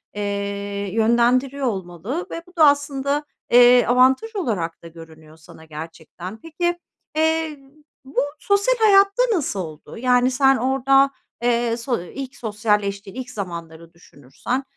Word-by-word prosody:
eee, 200 0 -3
yönlendiriyor 245 +4 +2
olmalı 195 - -4
ve 335 - -5
bu 360 - -20
da, 310 -3 +6
aslında, 285 0 0 0.3
eee, 245 0 +7
avantaj 260 - +3
olarak 205 - -3
da 170 - -9
görünüyor 160 -1 -14
sana, 160 0 -16
gerçekten. 165 +5 -9
Peki, 345 +2 -2 0.4
eee, 320 -1 0 0.5
bu 265 -1 -2 0.2
sosyal 405 +7 +2
hayatta 400 +1 +5
nasıl 290 - -1
oldu? 155 -4 -8
Yani, 250 +1 +2
sen 270 +1 +4
orada, 270 +2 +3 0.3
eee, 235 -1 +1
so 240 -3 -2
ilk 265 +8 -8
sosyalleştiğin 210 -3 -2
ilk 255 -1 -6
zamanları 170 -5 -7
düşünürsen, 170 - -6
245 Hz, 125 wpm, -21 LUFS, 195-280 Hz, 0.5 s, eee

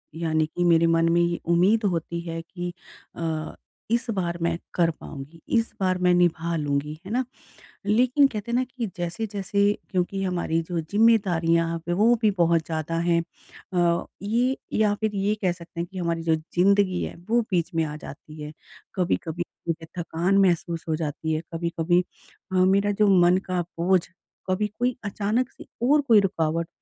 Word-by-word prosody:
यानी 160 -1 +1
कि 175 +3 -3
मेरे 165 -1 +5
मन 165 0 +3
में 170 +1 +4
ये 170 0 0
उम्मीद 190 +6 +4
होती 170 0 -3
है 165 -1 -5
कि 175 +1 -6 0.4
अ, 160 -2 -3 0.4
इस 235 +1 +2
बार 175 -5 -1
मैं 170 0 0 0.2
कर 170 -2 +3
पाऊँगी 155 +1 -10 0.2
इस 230 0 0
बार 185 -1 +1
मैं 180 0 +4
निभा 170 -1 +2
लूँगी। 145 0 -1
है 195 - -7
ना? 250 +3 +1 0.6
लेकिन 250 +6 +4
कहते 220 -2 -5
हैं - - +1
ना 255 - +2
कि 235 - -1
जैसे-जैसे 200 +3 -2 0.3
क्योंकि 190 +1 -1
हमारी 175 -3 0
जो 175 - -1
ज़िम्मेदारियाँ 170 -4 +2
अब 165 - -6
है - - +2
वो 225 +5 +5
भी 215 -2 +4
बहुत 170 -1 +3
ज़्यादा 160 0 -3
हैं। 170 0 +2 0.5
अ, 175 -1 +2 0.2
ये 240 +6 +1 0.2
या 215 -1 +3
फिर 215 0 -2
ये 200 +2 +1
कह 185 -3 +2
सकते 170 -1 -9
हैं 170 - -2
कि 190 - -8
हमारी 170 -2 -1
जो 165 -1 +3
ज़िंदगी 185 +3 +2
है - - -5
वो 235 +1 +4
बीच 175 -1 0
में 165 - +2
आ 150 -1 -5
जाती 150 +1 -10
है। 150 0 -6 0.4
कभी-कभी 175 -2 -1 0.2
मुझे 165 0 -2
थकान 175 +3 0
महसूस 170 -2 +1
हो 155 - +2
जाती 160 0 -3
है। 155 - -1
कभी-कभी 170 +1 +1 0.5
अ, - - 0
मेरा 195 +2 +4
जो 210 - +6
मन 175 +1 +5
का 180 -1 +1 0.2
बोझ। 180 +1 +3 0.5
कभी 195 +3 +1
कोई 245 0 +1
अचानक 215 +5 0
से - - -13 0.2
और 295 +1 +5
कोई 235 -7 +5
रुकावट 165 -4 0
175 Hz, 180 wpm, -25 LUFS, 165-200 Hz, 0.6 s, जो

